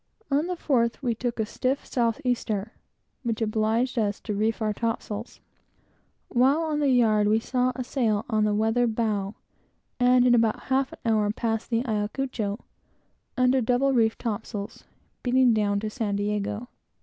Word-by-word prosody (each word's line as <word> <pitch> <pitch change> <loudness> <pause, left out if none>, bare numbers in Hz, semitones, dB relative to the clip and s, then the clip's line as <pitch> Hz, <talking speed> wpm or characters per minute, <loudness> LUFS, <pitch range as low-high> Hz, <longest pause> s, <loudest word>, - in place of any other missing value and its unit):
On 290 +4 +2
the 360 - -2
fourth, 245 -6 0
we 240 -3 +1
took 235 +1 -3
a 220 - +1
stiff 255 +5 -2
south 230 -3 0
easter, 220 -4 -1 0.5
which 230 -3 -2
obliged 225 +3 0
us 205 -2 0
to 215 - -4
reef 215 +2 0
our 215 -2 0
topsails. 225 0 -4 0.9
While 270 +6 +3
on 310 -2 -1
the 290 -2 +2
yard, 220 -5 +4
we 215 +1 +3
saw 250 +2 0
a 255 - -3
sail 225 -5 0
on 215 -2 +1
the 210 -1 +2
weather 225 +3 +2
bow, 215 -3 -1 0.6
and 250 0 +5
in 245 - +5
about 225 -2 +3
half 265 0 +1
an - - -12
hour, 215 -2 +2
passed 225 +1 -2
the 235 +1 0
Ayacucho, 215 -1 -2 0.8
under 255 +1 +3
double 250 +4 +2
reefed 225 -3 +2
topsails, 215 -1 -5 0.4
beating 255 -1 +4
down 205 -2 +1
to 215 - -2
San 215 -4 -2
Diego. 210 +3 -2
230 Hz, 160 wpm, -26 LUFS, 215-250 Hz, 0.9 s, and